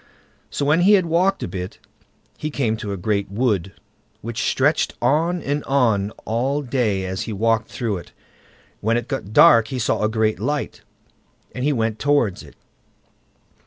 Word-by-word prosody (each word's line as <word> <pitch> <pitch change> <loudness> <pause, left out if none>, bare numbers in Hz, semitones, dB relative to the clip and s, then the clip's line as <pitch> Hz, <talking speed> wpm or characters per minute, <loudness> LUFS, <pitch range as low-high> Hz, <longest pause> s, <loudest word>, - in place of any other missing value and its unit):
So, 140 - -2
when 155 +4 +3
he 200 +4 +6
had 190 -3 +4
walked 180 +4 +1
a - - -2
bit, 90 0 -6 0.6
he 155 - -4
came 125 -7 0
to 105 -2 -5
a 100 - -3
great 100 +1 -1
wood, 100 -4 0 0.5
which 115 -1 -4
stretched - - +1
on 165 +4 +1
and 145 +1 -2
on 115 -8 +2 0.2
all 135 +6 -1
day 115 -7 0
as 95 0 -3
he - - -3
walked 115 +2 +1
through 115 -6 -2
it. 85 - -11 0.7
When 115 +2 +1
it 120 - -4
got 135 -7 -4
dark 115 0 +6
he 130 - -4
saw 115 - 0
a 105 - +2
great 110 -1 0
light, 150 0 -3 0.7
and 125 - -4
he 150 - +2
went 110 -4 -1
towards 145 -9 +1
it. - - -15
115 Hz, 170 wpm, -21 LUFS, 105-145 Hz, 0.7 s, he